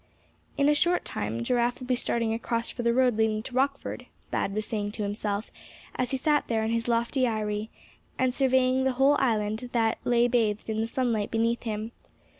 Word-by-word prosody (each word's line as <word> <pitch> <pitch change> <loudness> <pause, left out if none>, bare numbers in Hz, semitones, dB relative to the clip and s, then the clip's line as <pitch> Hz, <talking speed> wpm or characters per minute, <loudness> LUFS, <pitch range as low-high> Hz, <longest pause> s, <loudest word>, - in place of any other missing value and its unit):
"In 280 0 +3
a 295 - +5
short 345 +4 +2
time, 110 +3 -3
Giraffe 240 - +1
will 255 - -7
be 250 - +1
starting 230 -2 -1
across 230 0 -2
for 245 - -5
the 235 0 +2
road 250 -2 +3
leading 220 -1 +1
to 250 - -8
Rockford," 275 +2 -1 0.2
Thad - - 0
was 215 0 -1
saying 205 -2 -3
to 215 - -3
himself, 205 +1 -3 0.4
as 255 -1 -1
he 265 - -1
sat 295 +2 +1
there 225 -2 0
in 220 - -1
his 230 0 -1
lofty 235 +2 +1
eyrie, 215 -1 -2 0.5
and 255 -1 +1
surveying 260 -1 +3
the 265 0 +1
whole 270 +3 +4
island 220 -1 0
that 225 -2 +1
lay 240 0 +3
bathed 225 -3 0
in 220 0 -1
the 225 - -1
sunlight 230 -4 0
beneath 230 +1 0
him. 220 0 -4
235 Hz, 200 wpm, -27 LUFS, 220-255 Hz, 0.5 s, a